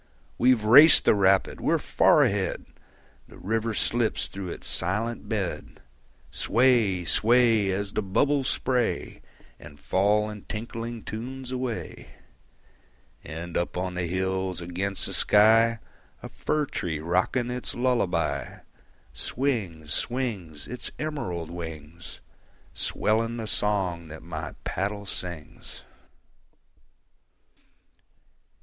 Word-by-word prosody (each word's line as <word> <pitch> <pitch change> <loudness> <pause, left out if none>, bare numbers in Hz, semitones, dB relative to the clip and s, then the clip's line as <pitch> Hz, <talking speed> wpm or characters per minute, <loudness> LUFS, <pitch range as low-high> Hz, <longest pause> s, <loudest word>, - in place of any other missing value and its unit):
We've 125 -3 +4
raced 140 +9 +8
the - - +6
rapid, 95 -1 +2
we're - - +2
far - - +4
ahead! 95 -2 -1 0.6
The - - -15
river 110 +2 -2
slips 115 0 +1
through 95 -2 -7
its - - -7
silent 105 +7 -1
bed. 100 -6 -3 0.5
Sway, 115 -7 +2
sway, 115 0 +3
As 100 +1 -2
the - - 0
bubbles 135 +8 +1
spray 125 -3 -1 0.4
And 75 - -13
fall 105 +3 +2
in 105 -1 -7
tinkling 115 +1 -6
tunes 125 +4 -6
away. 125 -3 -5 1.1
And 80 +3 -7
up 85 - -1
on 90 0 -2
the 90 -1 -2
hills 95 0 -2
against 90 +3 -3
the - - -5
sky, 115 +2 +5 0.5
A - - -7
fir 150 -1 -1
tree 85 - -3
rocking 95 - 0
its 125 0 -4
lullaby, 120 -7 -1 0.5
Swings, 90 - -2
swings, 100 - -3
Its 125 +1 -6
emerald 95 - -4
wings, 85 -1 -8 0.5
Swelling 115 +2 0
the 115 - -4
song 95 -6 -1
that 80 0 -10
my 80 -1 -6
paddle 100 +2 -3
sings. 85 -5 -8
105 Hz, 110 wpm, -26 LUFS, 90-120 Hz, 1.1 s, raced